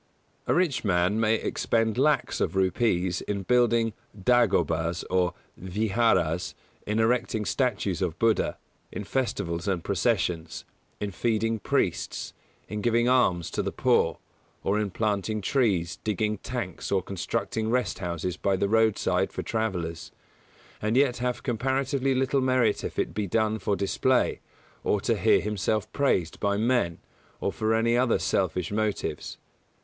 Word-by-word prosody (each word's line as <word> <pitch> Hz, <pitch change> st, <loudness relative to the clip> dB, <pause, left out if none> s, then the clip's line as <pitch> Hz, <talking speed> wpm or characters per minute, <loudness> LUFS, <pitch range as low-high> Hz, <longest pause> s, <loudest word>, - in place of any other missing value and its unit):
A -, -, +3 dB
rich 175 Hz, -7 st, +1 dB
man 90 Hz, +1 st, +2 dB
may 110 Hz, 0 st, +3 dB
expend 115 Hz, 0 st, 0 dB
lakhs 145 Hz, +4 st, +1 dB
of -, -, 0 dB
rupees 95 Hz, -2 st, +1 dB
in 100 Hz, -1 st, -3 dB
building 120 Hz, -1 st, +3 dB, 0.3 s
dāgobas 85 Hz, -7 st, +2 dB
or 90 Hz, -1 st, +2 dB, 0.3 s
vihāras, 95 Hz, -3 st, +1 dB, 0.3 s
in 105 Hz, +1 st, 0 dB
erecting 115 Hz, -1 st, +1 dB
statues 105 Hz, -9 st, 0 dB
of 85 Hz, -3 st, -1 dB
Buddha, 115 Hz, -1 st, +1 dB, 0.3 s
in -, -, -5 dB
festivals 100 Hz, -8 st, -2 dB
and 90 Hz, -4 st, 0 dB
processions, 90 Hz, -5 st, -1 dB, 0.3 s
in 105 Hz, -1 st, -3 dB
feeding 115 Hz, +2 st, 0 dB
priests, -, -, -1 dB, 0.3 s
in 105 Hz, 0 st, -4 dB
giving 120 Hz, +1 st, +2 dB
alms 95 Hz, -10 st, +2 dB
to -, -, -1 dB
the -, -, -2 dB
poor, -, -, +2 dB, 0.5 s
or 100 Hz, +2 st, +1 dB
in 105 Hz, -1 st, -1 dB
planting 105 Hz, +1 st, -1 dB
trees, 100 Hz, -, +1 dB
digging 105 Hz, -1 st, -1 dB
tanks, 115 Hz, -9 st, -5 dB
or 95 Hz, -2 st, +2 dB
constructing 110 Hz, +4 st, -2 dB
rest 125 Hz, 0 st, 0 dB
houses 90 Hz, -1 st, -3 dB
by 100 Hz, -1 st, +1 dB
the 95 Hz, +2 st, 0 dB
roadside 110 Hz, 0 st, +2 dB
for -, -, -4 dB
travellers, 90 Hz, -8 st, -3 dB, 0.7 s
and 110 Hz, +3 st, +1 dB
yet 135 Hz, -3 st, +3 dB
have 125 Hz, 0 st, -2 dB
comparatively 135 Hz, +2 st, 0 dB
little 135 Hz, +1 st, +1 dB
merit 130 Hz, -4 st, +2 dB
if -, -, -5 dB
it -, -, -1 dB
be 105 Hz, -1 st, -2 dB
done 110 Hz, +2 st, +1 dB
for 100 Hz, +1 st, 0 dB
display, 125 Hz, +6 st, +1 dB, 0.4 s
or -, -, +1 dB
to -, -, +1 dB
hear -, -, +3 dB
himself 105 Hz, 0 st, -1 dB
praised 95 Hz, -, +1 dB
by 100 Hz, 0 st, +1 dB
men, 110 Hz, -7 st, +1 dB, 0.4 s
or 100 Hz, -, -1 dB
for 110 Hz, +6 st, +1 dB
any 115 Hz, +1 st, +2 dB
other 125 Hz, -1 st, +3 dB
selfish 90 Hz, -2 st, -1 dB
motives. 105 Hz, 0 st, -2 dB
105 Hz, 145 wpm, -27 LUFS, 95-120 Hz, 0.7 s, A